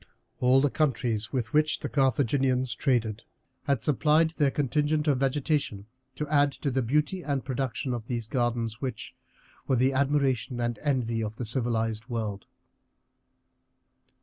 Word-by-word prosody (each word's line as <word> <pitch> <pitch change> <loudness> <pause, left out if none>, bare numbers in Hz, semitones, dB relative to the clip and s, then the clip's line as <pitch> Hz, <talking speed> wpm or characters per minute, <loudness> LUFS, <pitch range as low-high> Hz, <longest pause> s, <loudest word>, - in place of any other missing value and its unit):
All 130 +1 +5
the 145 -1 +2
countries 120 -8 0
with 120 -5 -2
which 155 0 +2
the - - -2
Carthaginians 130 -1 +1
traded 115 -6 0 0.4
had 140 -6 0
supplied 155 +3 +3
their 150 -3 +2
contingent 150 +3 0
of 140 -3 +3
vegetation 135 -6 0 0.3
to 150 - -3
add 145 -1 +3
to 140 - -3
the 130 +1 +1
beauty 150 +9 0
and 140 -5 -2
production 130 -1 -2
of 115 -2 -5
these 120 -3 -3
gardens, 120 -2 -1
which 125 -5 -5 0.5
were 130 - +3
the 130 +3 +2
admiration 135 -2 +1
and 120 -2 -2
envy 125 -6 0
of 110 0 -4
the 120 - -4
civilized 115 -2 -1
world. 110 -4 -4
130 Hz, 145 wpm, -27 LUFS, 115-145 Hz, 0.5 s, All